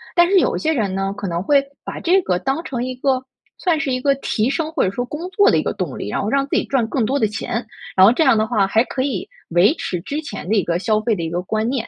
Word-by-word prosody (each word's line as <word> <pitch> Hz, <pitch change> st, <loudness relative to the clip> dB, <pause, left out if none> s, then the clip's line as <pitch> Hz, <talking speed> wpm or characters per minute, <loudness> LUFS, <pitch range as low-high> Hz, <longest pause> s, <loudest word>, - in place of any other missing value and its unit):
但 345 Hz, -1 st, +5 dB
是 390 Hz, -1 st, +5 dB
有 -, -, +1 dB
一 -, -, -3 dB
些 315 Hz, 0 st, +1 dB
人 210 Hz, -9 st, -1 dB
呢， 195 Hz, 0 st, -1 dB
可 200 Hz, -, -4 dB
能 170 Hz, -1 st, -2 dB
会 280 Hz, +5 st, +4 dB, 0.2 s
把 -, -, -5 dB
这 370 Hz, +3 st, +3 dB
个 180 Hz, -, 0 dB
当 270 Hz, -, -2 dB
成 245 Hz, -2 st, -3 dB
一 255 Hz, 0 st, -4 dB
个 260 Hz, 0 st, 0 dB, 0.3 s
算 340 Hz, -4 st, +1 dB
是 300 Hz, -4 st, -1 dB
一 255 Hz, -, -1 dB
个 275 Hz, +1 st, +3 dB
提 235 Hz, -3 st, -1 dB
升 310 Hz, +3 st, -2 dB
或 320 Hz, -, +1 dB
者 -, -, +2 dB
说 245 Hz, +5 st, -3 dB
工 315 Hz, +7 st, -6 dB
作 405 Hz, +2 st, +4 dB
的 -, -, +3 dB
一 -, -, +2 dB
个 -, -, -1 dB
动 -, -, -4 dB
力， -, -, -5 dB
然 -, -, -2 dB
后 205 Hz, -, -2 dB
让 275 Hz, +3 st, +2 dB
自 -, -, -2 dB
己 -, -, 0 dB
赚 265 Hz, -4 st, +1 dB
更 240 Hz, -2 st, 0 dB
多 275 Hz, +5 st, 0 dB
的 220 Hz, -, +3 dB
钱， 235 Hz, +2 st, -4 dB, 0.3 s
然 190 Hz, -, +7 dB
后 210 Hz, -, +7 dB
这 320 Hz, -, +2 dB
样 260 Hz, -6 st, +4 dB
的 215 Hz, 0 st, +1 dB
话 210 Hz, -4 st, +2 dB
还 220 Hz, +4 st, +3 dB
可 260 Hz, -, -3 dB
以 260 Hz, -9 st, -3 dB, 0.2 s
维 175 Hz, -, +4 dB
持 180 Hz, -, -4 dB
之 285 Hz, -, -4 dB
前 290 Hz, -, -7 dB
的 220 Hz, -, +2 dB
一 200 Hz, -, +3 dB
个 170 Hz, 0 st, 0 dB
消 215 Hz, +1 st, +1 dB
费 225 Hz, 0 st, +1 dB
的 170 Hz, -, -4 dB
一 165 Hz, -, -2 dB
个 175 Hz, +2 st, -2 dB
观 220 Hz, +4 st, -1 dB
念。 255 Hz, -3 st, -2 dB
245 Hz, 335 characters per minute, -20 LUFS, 205-280 Hz, 0.3 s, 然